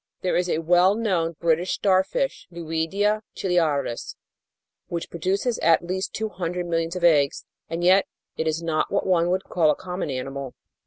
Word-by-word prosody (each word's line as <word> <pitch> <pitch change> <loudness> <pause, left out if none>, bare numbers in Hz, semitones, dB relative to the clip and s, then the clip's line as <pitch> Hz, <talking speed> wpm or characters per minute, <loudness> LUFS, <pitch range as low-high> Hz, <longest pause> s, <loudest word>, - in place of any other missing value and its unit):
There 185 - 0
is 180 0 +1
a - - +1
well 180 +4 +4
known 180 -7 0
British 170 +2 +1
starfish, 200 - 0
Luidia 170 +6 -1
ciliaris, 155 -9 0 0.7
which 170 -1 -5
produces 195 +8 -1
at 165 +1 +3
least 190 +2 -3
two 220 0 -3
hundred 180 -2 -3
millions 165 0 -1
of 180 - -4
eggs, 145 -5 +3 0.2
and 165 +1 -3
yet 185 +2 +5 0.3
it 160 - -2
is 160 +1 -1
not 160 -2 0
what 200 - 0
one 175 -2 +2
would 185 +1 0
call 165 -4 +2
a - - +3
common 180 -3 -5
animal. 135 0 -5
175 Hz, 165 wpm, -24 LUFS, 165-185 Hz, 0.7 s, yet